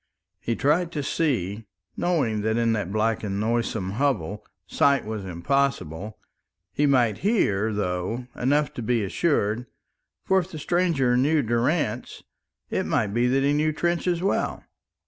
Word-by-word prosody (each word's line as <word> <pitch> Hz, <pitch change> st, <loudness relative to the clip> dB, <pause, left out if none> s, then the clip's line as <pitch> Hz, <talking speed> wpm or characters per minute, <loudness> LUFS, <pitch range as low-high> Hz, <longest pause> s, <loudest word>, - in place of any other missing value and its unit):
He 115 Hz, -, -2 dB
tried 160 Hz, +7 st, +1 dB
to 145 Hz, -, -2 dB
see, 115 Hz, -, -1 dB, 0.3 s
knowing 135 Hz, -12 st, 0 dB
that 110 Hz, +2 st, 0 dB
in 115 Hz, -1 st, +2 dB
that 100 Hz, -4 st, -2 dB
black 110 Hz, +1 st, 0 dB
and 100 Hz, -1 st, -2 dB
noisome 110 Hz, -3 st, -1 dB
hovel 105 Hz, -, -1 dB, 0.2 s
sight 140 Hz, -1 st, +2 dB
was 105 Hz, -2 st, -5 dB
impossible. 105 Hz, -, -1 dB, 0.6 s
He 145 Hz, -, +2 dB
might 120 Hz, -6 st, +3 dB
hear, 110 Hz, -, +1 dB
though, 100 Hz, +4 st, -2 dB
enough 145 Hz, +4 st, +1 dB
to -, -, -5 dB
be 115 Hz, -1 st, +1 dB
assured. 120 Hz, -, 0 dB, 0.6 s
For 190 Hz, -, +3 dB
if 180 Hz, 0 st, -4 dB
the 160 Hz, -, -8 dB
stranger 155 Hz, -6 st, +1 dB
knew 145 Hz, +4 st, +3 dB
Durrance, 120 Hz, +3 st, -1 dB, 0.5 s
it -, -, -1 dB
might 100 Hz, -2 st, 0 dB
be 120 Hz, +2 st, +2 dB
that 135 Hz, +2 st, +2 dB
he 140 Hz, +1 st, +3 dB
knew 155 Hz, +1 st, +2 dB
Trench 170 Hz, +3 st, -1 dB
as 175 Hz, 0 st, 0 dB
well. 195 Hz, -, 0 dB
120 Hz, 150 wpm, -25 LUFS, 105-150 Hz, 0.6 s, might